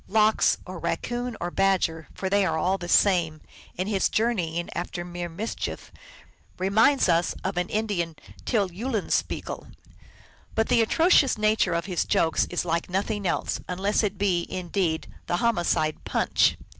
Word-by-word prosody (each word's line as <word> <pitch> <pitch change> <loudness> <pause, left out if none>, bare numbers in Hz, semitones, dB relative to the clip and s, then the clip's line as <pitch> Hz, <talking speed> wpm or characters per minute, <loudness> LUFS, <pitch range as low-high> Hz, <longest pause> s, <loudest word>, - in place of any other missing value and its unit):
Lox, 215 +1 +3
or 185 -2 -7
Raccoon, 235 +9 -3
or 175 - -3
Badger, 185 -5 +1
for 190 - -3
they 200 +1 +3
are 185 - 0
all 185 +4 +1
the 175 - -6
same, 170 -7 +3 0.4
in 185 - -2
his 200 -2 +1
journey 205 -8 0
ings 170 - -3
after 175 0 -4
mere 175 0 -5
mischief 205 +8 -5 0.7
reminds 220 +9 +3
us 170 0 +2
of 190 0 -2
an 180 +1 -1
Indian 200 -7 -1 0.3
Tyll 205 -6 0
Eulenspiegel. 220 +3 -2 0.9
But 225 0 +1
the 230 - +4
atrocious 300 +2 +4
nature 215 -4 +2
of 170 0 -1
his 180 -3 0
jokes 160 -1 +2
is 175 - -2
like 170 +1 -1
nothing 200 +2 -1
else, - - -1
unless 195 +3 +1
it 205 -2 -2
be 185 -3 0
indeed 175 -3 -1 0.2
the 175 - 0
homicide 175 -8 0
Punch. - - +2
185 Hz, 155 wpm, -26 LUFS, 175-215 Hz, 0.9 s, the